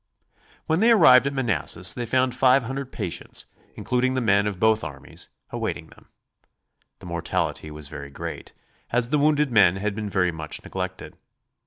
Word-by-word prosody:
When 160 Hz, +2 st, +1 dB
they 225 Hz, +3 st, +4 dB
arrived 140 Hz, -, +7 dB
at 140 Hz, -, -2 dB
Manassas 115 Hz, -, 0 dB
they 120 Hz, -1 st, -4 dB
found 130 Hz, +1 st, +1 dB
five 130 Hz, +1 st, +4 dB
hundred 135 Hz, +2 st, -5 dB
patients, 85 Hz, -, -4 dB, 0.3 s
including 130 Hz, +1 st, 0 dB
the -, -, +1 dB
men 100 Hz, -3 st, +2 dB
of 100 Hz, -3 st, -4 dB
both 110 Hz, 0 st, +3 dB
armies, 75 Hz, -3 st, -7 dB, 0.2 s
awaiting -, -, -4 dB
them. -, -, -19 dB, 0.9 s
The -, -, -14 dB
mortality 75 Hz, -, -3 dB
was 75 Hz, -1 st, -9 dB
very 70 Hz, 0 st, -8 dB
great, 70 Hz, -, -7 dB, 0.4 s
as 120 Hz, +1 st, +2 dB
the 150 Hz, -, +3 dB
wounded 150 Hz, -1 st, +2 dB
men 100 Hz, -5 st, +5 dB
had 100 Hz, +2 st, -2 dB
been 105 Hz, 0 st, -4 dB
very 90 Hz, -3 st, +1 dB
much 80 Hz, -2 st, -5 dB
neglected. -, -, -6 dB
115 Hz, 165 wpm, -24 LUFS, 95-130 Hz, 0.9 s, arrived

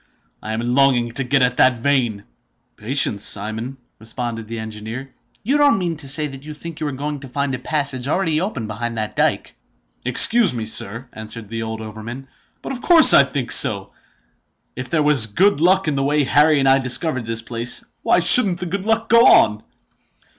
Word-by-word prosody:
I 110 Hz, -, -6 dB
am 110 Hz, -, -3 dB
longing 125 Hz, -3 st, +1 dB
to 135 Hz, +3 st, -3 dB
get 135 Hz, +1 st, +1 dB
at 125 Hz, 0 st, -1 dB
the -, -, +5 dB
vein!" 120 Hz, -4 st, -2 dB, 0.5 s
"Patience, 110 Hz, -3 st, +1 dB
Simon!" 110 Hz, +6 st, -1 dB, 0.2 s
responded 115 Hz, 0 st, -7 dB
the 115 Hz, +1 st, -7 dB
engineer. 110 Hz, +4 st, -8 dB, 0.3 s
"You 275 Hz, +7 st, 0 dB
don't 290 Hz, -5 st, +3 dB
mean 175 Hz, -3 st, -3 dB
to 145 Hz, -3 st, -5 dB
say 150 Hz, +3 st, +2 dB
that 135 Hz, -2 st, -9 dB
you 150 Hz, 0 st, -9 dB
think 165 Hz, +1 st, -10 dB
you 155 Hz, -, -3 dB
are -, -, -4 dB
going 145 Hz, +2 st, -6 dB
to 135 Hz, -, -11 dB
find 140 Hz, +1 st, -3 dB
a 130 Hz, -, -4 dB
passage 135 Hz, -2 st, -3 dB
all 150 Hz, -, 0 dB
ready 165 Hz, -5 st, -1 dB
open 180 Hz, -, -4 dB
behind 115 Hz, +2 st, -6 dB
that 110 Hz, -1 st, -5 dB
dyke?" -, -, -2 dB, 0.5 s
"Excuse 200 Hz, -, +4 dB
me, 115 Hz, -2 st, -4 dB
sir," 115 Hz, +3 st, -1 dB
answered 110 Hz, 0 st, -9 dB
the 115 Hz, 0 st, -5 dB
old 110 Hz, 0 st, -6 dB
overman; 110 Hz, +5 st, -9 dB, 0.4 s
"but -, -, -6 dB
of 250 Hz, -2 st, -7 dB
course 335 Hz, 0 st, +7 dB
I 140 Hz, -, +7 dB
think 135 Hz, -3 st, -5 dB
so! -, -, +3 dB, 0.8 s
If 125 Hz, 0 st, -7 dB
there 155 Hz, 0 st, 0 dB
was 145 Hz, -7 st, +4 dB
good 170 Hz, -, +1 dB
luck 185 Hz, +1 st, +2 dB
in 150 Hz, -, -1 dB
the 135 Hz, -, -1 dB
way 145 Hz, +1 st, 0 dB
Harry 150 Hz, +3 st, +2 dB
and 135 Hz, -1 st, 0 dB
I 135 Hz, 0 st, +4 dB
discovered 130 Hz, -1 st, -1 dB
this 115 Hz, 0 st, -2 dB
place, 120 Hz, +1 st, -2 dB, 0.2 s
why 180 Hz, -, +1 dB
shouldn't 190 Hz, -2 st, +4 dB
the 180 Hz, -, -5 dB
good 190 Hz, +3 st, -5 dB
luck 225 Hz, +1 st, -1 dB
go 230 Hz, +1 st, +5 dB
on?" 105 Hz, 0 st, +4 dB
135 Hz, 200 wpm, -19 LUFS, 115-155 Hz, 0.8 s, course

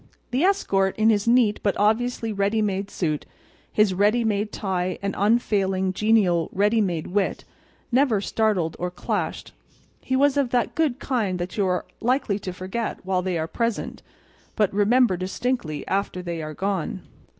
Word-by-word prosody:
The 255 Hz, +3 st, +1 dB
escort, 195 Hz, -, +2 dB
in 220 Hz, +1 st, +4 dB
his 205 Hz, 0 st, 0 dB
neat 235 Hz, -3 st, +4 dB
but 200 Hz, -, 0 dB
obviously 225 Hz, +2 st, +1 dB
ready 200 Hz, +2 st, +1 dB
made 200 Hz, -2 st, -1 dB
suit, 155 Hz, -7 st, -2 dB, 0.4 s
his 210 Hz, -3 st, +3 dB
ready 210 Hz, +5 st, +3 dB
made 210 Hz, -1 st, 0 dB
tie 185 Hz, -3 st, -2 dB
and 200 Hz, 0 st, -2 dB
unfailing, 195 Hz, -3 st, +1 dB
genial, 190 Hz, -5 st, +2 dB
ready 210 Hz, +3 st, +2 dB
made 175 Hz, -6 st, -1 dB
wit 195 Hz, +1 st, -1 dB, 0.5 s
never 250 Hz, -4 st, +3 dB
startled 200 Hz, -5 st, 0 dB
or 180 Hz, -, -1 dB
clashed. 180 Hz, -, -3 dB, 0.5 s
He 260 Hz, -, -1 dB
was 285 Hz, +1 st, +3 dB
of 275 Hz, -3 st, +2 dB
that 245 Hz, -1 st, 0 dB
good 305 Hz, -6 st, +1 dB
kind 220 Hz, -10 st, -1 dB
that 175 Hz, 0 st, -5 dB
you 200 Hz, -3 st, +1 dB
are 180 Hz, 0 st, -1 dB
likely 245 Hz, -4 st, 0 dB
to 190 Hz, -, -5 dB
forget 190 Hz, +6 st, -4 dB
while 185 Hz, -1 st, +1 dB
they 180 Hz, -1 st, -1 dB
are 160 Hz, 0 st, -2 dB
present, 230 Hz, +5 st, -2 dB, 0.5 s
but 210 Hz, -4 st, +1 dB
remember 210 Hz, 0 st, +3 dB
distinctly 185 Hz, -, -3 dB
after 190 Hz, -2 st, -1 dB
they 170 Hz, -2 st, -4 dB
are 155 Hz, 0 st, -6 dB
gone. 195 Hz, -1 st, -2 dB
205 Hz, 160 wpm, -24 LUFS, 185-230 Hz, 0.5 s, in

